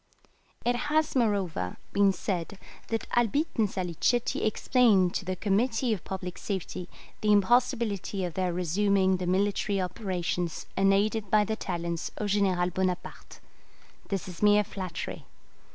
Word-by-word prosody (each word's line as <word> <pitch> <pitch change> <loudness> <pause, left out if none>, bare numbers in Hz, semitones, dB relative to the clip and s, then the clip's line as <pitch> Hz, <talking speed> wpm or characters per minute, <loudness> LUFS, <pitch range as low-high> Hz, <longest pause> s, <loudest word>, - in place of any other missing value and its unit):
] - - -33
It 245 0 +2
has, 310 0 +1
moreover, 195 - 0 0.2
been 200 -1 +4
said 185 0 -3 0.3
that 225 -1 -2
Albitte 260 +7 +1
and 215 -2 +3
Salicetti 185 +7 0
explained 215 -5 +3
to 190 - -3
the 185 0 -2
Committee 225 +4 +1
of 190 - -5
Public 185 -2 -5
Safety 185 -2 -4 0.3
the 210 -1 +3
impossibility 210 -2 +2
of 175 - -5
their 185 +1 0
resuming 190 +2 +2
the 180 -1 -4
military 200 +2 +1
operations 180 -3 -2
unaided 200 +2 +2
by 210 +1 +5
the 220 +1 -2
talents 170 -4 -3
of 210 - -2
General 185 -3 +2
Bonaparte. 185 0 -3 0.7
This 195 -3 -3
is 180 -2 -9
mere 210 0 +5
flattery. 190 -4 -6
195 Hz, 135 wpm, -28 LUFS, 180-215 Hz, 0.7 s, by